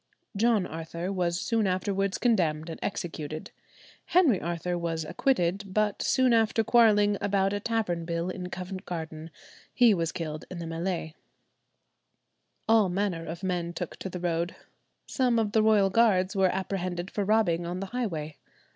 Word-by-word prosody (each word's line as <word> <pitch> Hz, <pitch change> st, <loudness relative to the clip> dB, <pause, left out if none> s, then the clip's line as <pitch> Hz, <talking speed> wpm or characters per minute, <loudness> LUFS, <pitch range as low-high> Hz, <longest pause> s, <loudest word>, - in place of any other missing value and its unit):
John 215 Hz, -2 st, +3 dB
Arthur 170 Hz, +2 st, -5 dB
was 175 Hz, -2 st, 0 dB
soon 225 Hz, -1 st, +1 dB
afterwards 195 Hz, +1 st, 0 dB
condemned 165 Hz, -9 st, +1 dB
and -, -, -8 dB
executed. 160 Hz, -5 st, -5 dB, 0.5 s
Henry 310 Hz, -, +4 dB
Arthur 175 Hz, +2 st, -2 dB
was 165 Hz, -2 st, -2 dB
acquitted, 195 Hz, -, 0 dB
but 210 Hz, +1 st, 0 dB
soon 260 Hz, -2 st, +3 dB
after 225 Hz, 0 st, +3 dB
quarrelling 210 Hz, -3 st, +4 dB
about 195 Hz, -1 st, +1 dB
a 205 Hz, -, -1 dB
tavern 205 Hz, -6 st, -1 dB
bill 170 Hz, +1 st, -2 dB
in 180 Hz, -1 st, -6 dB
Covent 185 Hz, +1 st, -6 dB
Garden, 160 Hz, -2 st, -6 dB, 0.4 s
he 240 Hz, -3 st, +5 dB
was 165 Hz, -3 st, -1 dB
killed 155 Hz, -4 st, -5 dB
in 185 Hz, -, -7 dB
the 170 Hz, -, -5 dB
mêlée. 165 Hz, 0 st, -3 dB, 1.5 s
All 220 Hz, -4 st, +5 dB
manner 180 Hz, -3 st, -2 dB
of 170 Hz, +4 st, -6 dB
men 175 Hz, -2 st, -2 dB
took 175 Hz, -1 st, -5 dB
to 190 Hz, -, -5 dB
the 180 Hz, -, -6 dB
road. 170 Hz, 0 st, -1 dB, 0.5 s
Some 250 Hz, -3 st, +1 dB
of 220 Hz, -2 st, +1 dB
the 220 Hz, -, +3 dB
royal 210 Hz, -3 st, +4 dB
guards 200 Hz, -3 st, +3 dB
were 190 Hz, -1 st, +4 dB
apprehended 185 Hz, -1 st, -3 dB
for 205 Hz, -, -1 dB
robbing 190 Hz, -5 st, +2 dB
on 180 Hz, +1 st, -3 dB
the 195 Hz, -, -3 dB
highway. 160 Hz, -12 st, -3 dB
185 Hz, 155 wpm, -28 LUFS, 170-210 Hz, 1.5 s, he